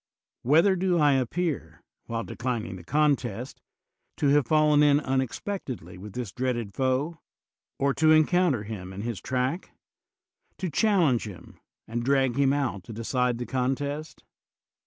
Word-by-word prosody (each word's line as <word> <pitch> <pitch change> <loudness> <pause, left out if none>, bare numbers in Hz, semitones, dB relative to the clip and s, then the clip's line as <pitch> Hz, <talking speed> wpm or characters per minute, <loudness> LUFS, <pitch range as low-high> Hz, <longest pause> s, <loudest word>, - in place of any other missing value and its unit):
Whether 165 +9 +4
do 180 -1 +1
I 150 -3 +4
appear, 135 - -2 0.2
while 115 0 -3
declining 120 -6 -3
the 90 - -10
contest, 130 - 0 0.6
to 145 - +2
have 145 -3 +3
fallen 150 0 +4
in 145 -1 +5
unexpectedly 130 - -3
with 100 +1 -9
this 120 -4 -4
dreaded 120 -5 -2
foe, 135 - -1 0.6
w 140 0 +2
to 155 +2 +4
encounter 155 - +3
him 95 -3 -7
in 95 - -6
his 115 -4 -4
track? 130 +7 -2 0.8
to 185 -3 -3
challenge 165 - +2
him, 95 -5 -12 0.3
and 120 +1 -3
drag 135 -1 +2
him 140 -1 +3
out 125 -10 -1
to 115 - -8
decide 125 +2 0
the 120 - -4
contest? 140 +4 -3
130 Hz, 140 wpm, -27 LUFS, 115-150 Hz, 0.8 s, in